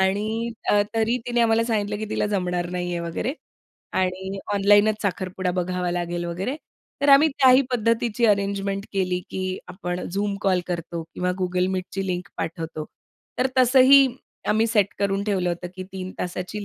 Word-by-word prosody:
आणि 215 +5 0 0.2
अ, 205 - +5
तरी 225 +2 +2
तिने 240 -1 +1
आम्हाला 230 0 +3
सांगितलं, 210 -3 -1
की 215 - -3
तिला - - 0
जमणार 180 -4 -1
नाहीये 175 -1 -2
वगैरे. 170 - -3 0.6
आणि 190 +1 -1 0.2
ऑनलाईनच 205 +2 +4
साखरपुडा 185 -1 -2
बघावा 180 0 -2
लागेल 175 0 -2
वगैरे. 185 +11 -3 0.4
तर 285 - +1
आम्ही 280 +3 +7
त्याही 260 -1 +7
पद्धतीची 230 0 +1
अरेंजमेंट 200 -1 0
केली, 185 -2 0
की 185 0 -3
आपण 180 -1 -4 0.2
Zoom 200 0 0
कॉल 185 -2 +2
करतो 170 -1 -4
किंवा 180 0 -1
Google 180 0 +1
Meetची 190 +1 -3
लिंक 180 -1 -3
पाठवतो. 160 -1 -4 0.5
तर 255 - +3
तसंही 260 +2 +7 0.4
आम्ही 220 +2 +3
सेट 215 -4 +3
करून 200 0 0
ठेवलं 190 -4 0
होतं, 175 +1 -3
की 185 - -5
3 185 -1 -5
तासाची 185 +3 -4
195 Hz, 155 wpm, -24 LUFS, 180-220 Hz, 0.6 s, आम्ही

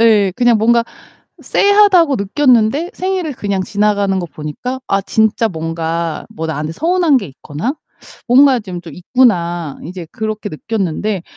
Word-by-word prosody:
예 210 -5 +4
그냥 240 -2 +3
뭔가 235 +2 +3 0.6
쎄하다고 400 -8 +4
느꼈는데 250 - +2
생일을 370 -4 -2
그냥 200 -6 -2
지나가는 205 0 0
거 175 - -3
보니까 155 - -6
'아 195 - +1
진짜 220 +3 +1
뭔가 165 -1 -3
뭐 160 +1 -5
나한테 155 0 -3
서운한 335 - +2
게 255 - -1
있거나 150 - -5 0.5
뭔가 260 0 +5
좀 185 -4 -7
좀 165 -4 -10
있구나.' 175 - 0
이제 175 +1 -7
그렇게 215 -1 -4
느꼈는데 195 +1 -3
210 Hz, 305 characters per minute, -16 LUFS, 170-255 Hz, 0.6 s, 뭔가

